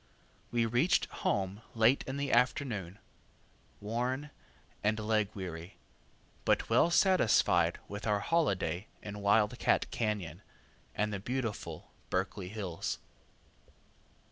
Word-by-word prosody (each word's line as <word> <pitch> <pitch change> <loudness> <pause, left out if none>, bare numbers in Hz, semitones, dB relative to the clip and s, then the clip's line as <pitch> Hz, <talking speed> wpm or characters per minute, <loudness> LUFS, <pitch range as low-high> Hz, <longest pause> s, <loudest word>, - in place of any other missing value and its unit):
We 120 -1 +1
reached 125 - +3 0.2
home 100 +1 0
late 115 +4 +4
in 130 +1 -3
the 140 -1 -1
afternoon, 115 - +1 0.8
worn, 125 +7 -2 0.5
and 105 +1 +2
leg 105 -1 +1
weary, 90 -2 -7 0.7
but - - +1
well - - +5
satisfied 115 - +4
with 100 +2 -6
our 105 -1 +2
holiday 100 - 0 0.2
in 105 0 -6
Wild 105 +1 +3
cat - - +3
Cañon 100 -7 -2 0.6
and 105 +1 0
the 100 - -2
beautiful 120 +1 -4 0.2
Berkeley 95 0 -2
hills. 95 -5 -3
105 Hz, 110 wpm, -32 LUFS, 95-120 Hz, 0.8 s, well